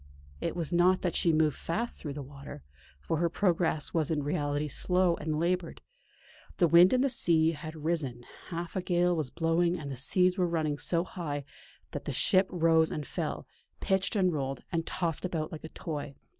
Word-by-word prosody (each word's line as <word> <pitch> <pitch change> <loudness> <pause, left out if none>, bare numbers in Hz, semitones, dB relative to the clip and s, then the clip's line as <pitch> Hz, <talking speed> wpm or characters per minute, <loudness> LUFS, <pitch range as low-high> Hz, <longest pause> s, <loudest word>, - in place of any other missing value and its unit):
It - - -3
was 170 -1 -2
not 180 +2 +3
that 180 - 0
she 170 - +3
moved 155 -2 +2
fast 230 +8 -3
through 145 -3 -5
the 145 - -5
water, 140 - -10 0.4
for 160 - -2
her 170 +1 +1
progress 170 -4 0
was 160 -3 +1
in 150 -3 0
reality 145 0 -1
slow 180 +4 +2
and 155 0 -2
laboured. 175 0 -1 0.8
The 175 - +4
wind 170 +3 +7
and 255 0 +3
the - - +3
sea 165 -9 +3
had 155 0 -7
risen; 140 -8 -1 0.2
half 170 -1 -5
a 185 - 0
gale 175 0 +2
was 155 -5 -2
blowing 170 +1 +1
and 145 -4 -6
the - - -4
seas 180 +8 +3
were 180 - +3
running 155 -3 -1
so 170 -1 +2
high 150 -6 -5 0.5
that - - -6
the - - -3
ship 190 -1 +3
rose 165 -2 +3
and 150 - -4
fell, - - -4 0.3
pitched 190 +3 0
and 185 -3 +2
rolled 135 -3 -3
and 165 -1 -2
tossed 170 -4 -1
about 165 -4 -2
like 155 - -8
a 160 - -7
toy. 145 -4 -6
165 Hz, 195 wpm, -30 LUFS, 150-180 Hz, 0.8 s, wind